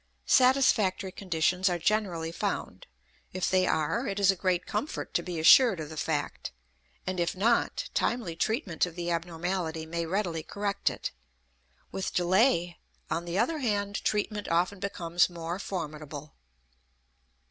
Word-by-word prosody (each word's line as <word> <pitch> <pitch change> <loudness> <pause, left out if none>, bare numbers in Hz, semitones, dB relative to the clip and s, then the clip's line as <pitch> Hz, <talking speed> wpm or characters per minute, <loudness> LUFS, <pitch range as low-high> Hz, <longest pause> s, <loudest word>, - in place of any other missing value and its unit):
Satisfactory 250 -8 +3
conditions 180 0 +1
are 175 - 0
generally 170 -3 0
found; - - -4 0.5
if 185 0 -1
they 185 -1 +3
are, 165 - 0
it 200 0 -2
is 195 -1 +5
a - - -4
great 180 -1 0
comfort 215 +9 -4
to - - +2
be 175 -2 -5
assured 210 +4 +7
of 155 -2 -5
the 160 - -8
fact; 150 -1 -2 0.5
and 185 -1 -2
if 170 +1 0
not, 230 +5 +1
timely 225 -9 -1
treatment 195 - 0
of 170 - -10
the 175 -1 -3
abnormality 170 -1 -2
may 170 +1 -3
readily 175 -3 -1
correct 200 +4 -1
it; - - -5 0.8
with 190 - -4
delay, 175 -1 +2 0.3
on 170 +1 -1
the 175 +1 -3
other 270 +9 +1
hand, 205 -5 -1
treatment 210 0 -1
often 175 +4 +1
becomes 175 -3 +1
more 170 +1 -5
formidable. 150 -6 -6
180 Hz, 145 wpm, -29 LUFS, 165-200 Hz, 0.8 s, assured